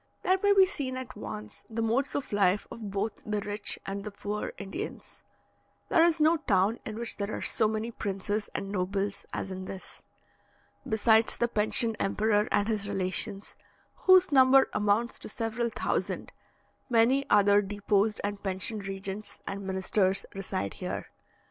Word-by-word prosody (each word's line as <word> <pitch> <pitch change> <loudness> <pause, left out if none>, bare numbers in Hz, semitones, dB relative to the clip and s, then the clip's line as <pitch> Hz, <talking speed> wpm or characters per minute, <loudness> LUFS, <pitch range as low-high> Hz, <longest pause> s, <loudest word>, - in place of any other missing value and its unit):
There 375 +1 +3
may 405 - +4
be 385 -1 +8
seen 275 -9 -4
at 255 -1 -7
once 105 - -7
the 225 0 -2
modes 245 +5 0
of 280 -6 -3
life 200 0 +2
of 220 -3 -7
both 200 +2 -3
the 210 -1 -2
rich 205 +1 -1
and 200 +1 -4
the 210 - -5
poor 205 +1 -4
Indians. 195 -1 -7 0.7
There 330 - +5
is 340 -1 +3
no 315 +2 +4
town 205 -5 +1
in 215 0 -5
which 235 0 -4
there 200 0 -3
are - - -5
so 220 - +2
many 220 +2 -2
princes 205 0 -3
and 195 - -3
nobles 195 +1 -2
as 190 - -4
in 185 0 -5
this. 190 0 -9 0.9
Besides 220 +1 +3
the 235 - +2
pensioned 225 +1 +3
emperor 210 +1 +1
and 205 - +2
his 210 -3 -1
relations, 195 +1 -2 0.4
whose 370 -2 +5
number 265 -1 +6
amounts 210 +3 +1
to - - -9
several 230 +2 -2
thousand, - - -2 0.6
many 245 +4 +3
other 205 0 +5
deposed 205 +1 0
and 205 0 -3
pensioned 195 +2 -2
regents 195 +2 -6
and 195 0 -5
ministers 190 +1 +1
reside 180 - -3
here. - - -5
210 Hz, 160 wpm, -29 LUFS, 195-230 Hz, 0.9 s, be